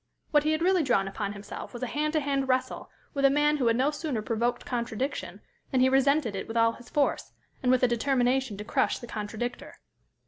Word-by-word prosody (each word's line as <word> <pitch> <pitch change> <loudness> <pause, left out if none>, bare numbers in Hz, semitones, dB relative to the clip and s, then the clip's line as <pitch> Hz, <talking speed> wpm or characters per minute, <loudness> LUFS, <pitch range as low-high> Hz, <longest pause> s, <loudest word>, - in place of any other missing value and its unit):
What 295 - +5
he 305 - +1
had 315 +1 0
really 370 0 +4
drawn 245 -9 +2
upon 200 +1 -4
himself 200 +5 -8
was 240 - -5
a - - +1
hand 300 +4 -1
to 310 - +2
hand 275 -1 0
wrestle 260 0 -1 0.2
with 280 -2 -2
a 275 - +7
man 295 +2 +3
who 255 -4 +1
had 230 - +3
no 265 +5 +2
sooner 290 -7 -3
provoked 240 +1 -1
contradiction 245 +2 -3 0.3
than 260 - +1
he 260 +1 +5
resented 270 -3 +2
it 190 - -4
with 225 - -4
all 230 0 +4
his 240 +1 -14
force, 290 -1 0 0.3
and 250 - +2
with 255 0 +3
a - - +6
determination 250 -1 +1
to 210 - -5
crush - - +1
the - - -9
contradictor. 220 +2 -5
255 Hz, 220 wpm, -28 LUFS, 230-280 Hz, 0.3 s, a